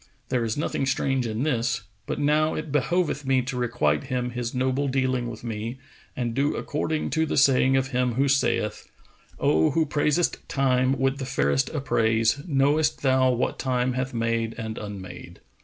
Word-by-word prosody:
There 125 -2 +1
is 110 +2 -2
nothing 140 -2 -1
strange 135 -2 0
in 110 +3 -2
this; 125 -4 0 0.2
but - - -2
now 150 +2 +2
it 155 -1 -5
behoveth 150 +1 0
me 130 -1 +2
to 125 +1 -5
requite 75 -12 0
him 125 -1 -2
his 120 -1 -3
noble 130 +2 0
dealing 130 -2 0
with 110 -1 -9
me 115 +1 -4 0.4
and 120 -2 -2
do 140 +4 +1
according 155 +1 -2
to 160 0 +1
the - - -2
saying 135 -1 +4
of 135 0 0
him 125 -1 0
who 135 +3 +2
saith, 120 -6 0 0.5
'O 80 +1 +3
who 165 -1 +1
praisest 150 +3 +1
Time 130 -1 +2
with 135 +1 0
the 135 - -3
fairest 70 - +1
appraise, 115 -3 +1
* - - -14
Knowest 145 +1 +2
thou 130 -1 +4
what 125 0 -1
Time 125 -1 0
hath 130 +1 -2
made 115 -1 -1
and 110 -1 -5
unmade? 100 -3 -8
130 Hz, 175 wpm, -25 LUFS, 115-140 Hz, 0.5 s, saying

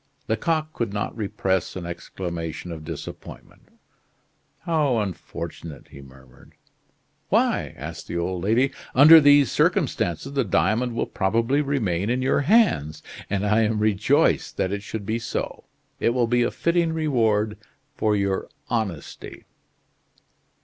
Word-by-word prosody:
Lecoq 155 +8 -1
could 115 -4 -2
not 105 0 -3
repress 95 -4 -1
an 90 -2 -5
exclamation 85 -1 -6
of 80 -2 -7
disappointment. - - -10 0.9
"How 155 -7 +1
unfortunate!" 85 -6 -6
he 70 - -12
murmured. 65 -2 -17 0.8
"Why?" - - +1
asked 80 +5 -8
the 85 - -4
old 90 +1 -2
lady. 120 +7 +2 0.2
"Under 155 +5 +9
these 145 -3 +5
circumstances, 90 - 0
the 135 -1 +1
diamond 115 +4 +1
will - - 0
probably 115 +8 +1
remain 110 - -1
in 125 +1 0
your 135 - +2
hands, 145 - +2 0.3
and 100 0 -1
I 105 +2 +3
am 110 0 +1
rejoiced 105 -2 +2
that 95 - 0
it 100 0 -3
should 105 0 -6
be 110 +3 -1
so. 115 - -4 0.3
It 120 - +1
will 125 -2 +3
be 120 +1 +1
a 120 - +2
fitting 170 -1 0
reward 110 -9 +1 0.4
for 105 -1 +1
your 100 -1 -1 0.2
honesty." 110 - -4
110 Hz, 135 wpm, -24 LUFS, 90-130 Hz, 0.9 s, Under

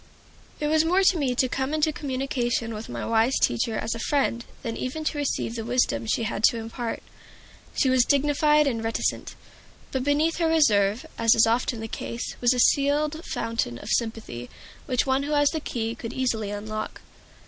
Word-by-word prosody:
It 300 - -2
was 310 +1 +3
more 365 +4 +3
to 375 -1 +4
me 260 -4 0
to 255 - +2
come 265 +4 -2
into 310 0 +1
communication 255 -5 -2
with 215 +1 -7
my 120 -1 -4
wise 230 +3 +2
teacher 120 - +1
as - - -2
a 230 - -6
friend 240 -2 0 0.2
than 230 -1 -3
even 290 +5 -4
to 305 - -2
receive 275 -5 -1
the 230 -1 -4
wisdom 220 - 0
she 230 - 0
had 205 -1 -3
to 235 - +3
impart. 230 +1 -5 0.7
She - - +2
was 255 -1 +4
dignified 295 +2 +3
and 230 -5 -1
reticent, 225 0 -2 0.6
but 260 -1 -1
beneath 295 +4 +1
her 335 -1 +1
reserve, 220 -6 +3
as 230 0 +5
is 225 - +6
often 230 0 0
the 225 - -4
case, 235 +2 -5
was 245 0 +4
a 250 - 0
sealed 295 +4 +2
fountain 230 - -2
of - - -9
sympathy, 220 - -2 0.4
which 255 0 +1
one 265 0 +1
who 290 +2 -2
had 290 -1 +4
the 320 - -1
key 230 -6 -3
could 235 0 -7
easily 230 -5 -1
unlock. 215 +1 -5
250 Hz, 190 wpm, -25 LUFS, 225-290 Hz, 0.7 s, is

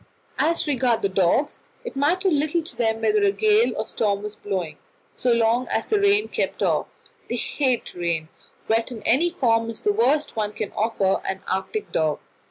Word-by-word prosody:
As 335 +1 +2
regards 255 -5 +1
the 200 - +2
dogs, 190 - +1 0.2
it 475 - -6
mattered 345 +6 +2
little 310 +3 +1
to 325 - -8
them 225 -1 0
whether 425 0 +3
a 405 - +4
gale 430 +2 +3
was 210 0 -2
blowing, 180 -7 -4 0.3
so 250 - 0
long 235 +2 +2
as - - -1
the 425 - +1
rain 405 +1 +3
kept - - -2
off. - - +1 0.4
They - - -1
hate 260 -5 -1
rain; 170 -3 -2 0.4
wet 225 +3 +1
in 225 -3 -8
any 305 +9 +3
form 230 -9 +1
is 225 - -6
the 415 - +2
worst 310 -9 +1
one 210 -1 -2
can 215 -1 -4
offer 205 -3 0
an 190 0 -4
Arctic 190 - -3
dog. 155 -2 +1
235 Hz, 180 wpm, -23 LUFS, 205-335 Hz, 0.4 s, a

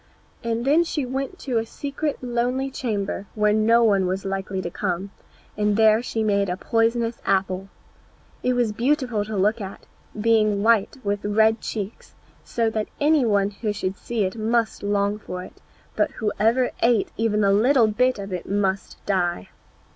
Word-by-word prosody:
And 230 +1 -1
then 305 +5 +4
she 300 -4 -2
went 270 +7 -4
to 250 -4 0
a 225 - -3
secret 285 +2 -4
lonely 250 +2 -1
chamber, 205 -6 -3
where 210 -1 +3
no 225 +2 +4
one 200 -4 +3
was 190 +2 -2
likely 195 0 -3
to 175 -2 -4
come, 190 +1 -3 0.4
and 210 0 +1
there 220 0 +5
she 225 -2 -2
made 200 -2 +1
a 180 - -2
poisonous 230 +2 0
apple. 190 0 0 0.7
It 250 - +1
was 240 -3 +1
beautiful 245 -1 0
to 210 0 -5
look 210 +4 +2
upon, 195 -3 -6 0.4
being 215 -2 +3
white 230 +3 +3
with 200 0 -1
red 220 +2 +3
cheeks, 210 0 -6 0.3
so 230 -1 -1
that 215 -1 -2
any 295 -2 +3
one 200 -2 +2
who 210 +1 -3
should 195 -2 -3
see 230 0 -2
it 190 - -3
must 225 0 0
long 205 0 0
for 180 -3 -6
it, - - -14 0.3
but - - +2
whoever 225 +4 +1
ate 230 -3 +3
even 215 -2 +1
a 195 0 +4
little 240 +4 +4
bit 250 +4 +2
of 200 -1 -6
it 180 - -5
must 195 -1 -1
die. 175 - -1
215 Hz, 170 wpm, -23 LUFS, 200-235 Hz, 0.7 s, there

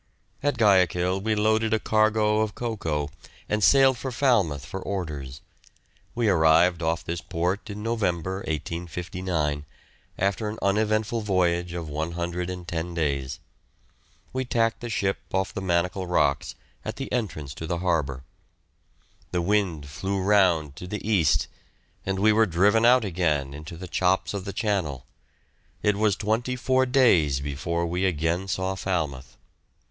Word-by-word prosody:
At 145 -2 0
Guayaquil 95 -3 +3
we 110 +1 0
loaded 110 +1 +2
a - - 0
cargo 110 0 +2
of 110 -2 -1
cocoa 80 -11 -2 0.4
and 105 -1 0
sailed 135 0 +5
for 130 - -4
Falmouth 105 - +1
for 95 +4 -6
orders. 75 -10 -5 0.7
We 120 -1 +1
arrived 85 -1 +4
off 80 0 0
this 85 +1 -4
port 90 +6 -2
in 105 +1 -6
November, 95 -5 -1
1859, 85 -2 -3 0.5
after 100 +3 0
an 110 - -6
uneventful 110 +3 +1
voyage 90 -4 +1
of 85 -2 -4
110 85 +2 -3
days. 70 -5 -1 0.9
We 130 0 -1
tacked 115 -2 0
the 120 - -6
ship 100 -3 0
off 95 0 -1
the 100 - -4
Manacle 90 +1 0
Rocks, 70 -5 +1 0.3
at - - -4
the - - -6
entrance 80 - -3
to 80 - -7
the 85 0 -1
harbour; 75 -7 -1 1.1
the 90 - -1
wind 90 -6 0
flew 95 +7 -3
round 90 -7 +3
to 90 - -7
the 105 +2 -5
east, 90 -9 +3 0.6
and 95 0 0
we 105 +3 +4
were 110 +1 +4
driven 100 +6 +3
out 125 -1 +5
again 80 -7 0
into 80 +3 -8
the 90 +2 -7
chops 95 +3 +1
of 100 -2 -4
the 100 - -4
channel; 95 - -2 0.8
it 105 -1 +3
was 105 -1 +2
twenty 115 +5 -1
four 130 +1 +2
days 95 - +4
before 75 +5 -2
we 90 +2 -1
again 85 +2 0
saw 95 0 -1
Falmouth. 80 -9 -3
95 Hz, 145 wpm, -25 LUFS, 80-105 Hz, 1.1 s, sailed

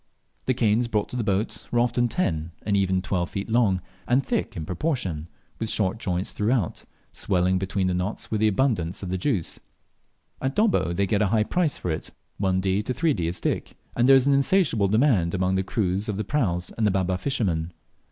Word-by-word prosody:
The 130 - +2
canes 115 0 +2
brought 105 -3 -1
to - - -6
the 120 - -1
boat 100 +1 -1
were 120 - +1
often 120 0 +2
ten 85 - -1
and 100 - 0
even 95 -1 +1
twelve 90 -3 -1
feet 100 +3 -5
long, 105 -6 +3 0.3
and 130 +3 +2
thick 235 - -2
in 80 - -4
proportion, 90 - -2 0.3
with 115 - -2
short 105 +1 +1
joints 90 -3 -1
throughout, 105 -3 -1 0.3
swelling 95 -1 +1
between 95 0 -1
the 90 - +1
knots 90 +4 -3
with 110 - 0
the 110 - +5
abundance 100 -6 0
of 90 - -4
the - - -3
rich 95 - -2
juice. 105 - -1 0.8
At 135 +1 -1
Dobbo 210 - +2
they 100 +3 +1
get 100 +1 +1
a 105 - +3
high 105 +2 +2
price 165 +4 0
for 90 - -3
it, 80 - -4 0.3
1d. 95 +1 +1
to 125 - -1
3d. 135 - +1
a - - -1
stick, 90 - -3 0.2
and 120 +2 +3
there 135 - +9
is 135 -1 +4
an 140 - +4
insatiable 140 - +3
demand 105 - +2
among 95 0 +1
the 95 - +2
crews 95 +1 -1
of 100 - -2
the 105 - -1
praus 95 -9 -1
and 110 -2 +1
the - - +4
Baba 95 -1 0
fishermen. 90 -10 -1
100 Hz, 210 wpm, -25 LUFS, 90-120 Hz, 0.8 s, there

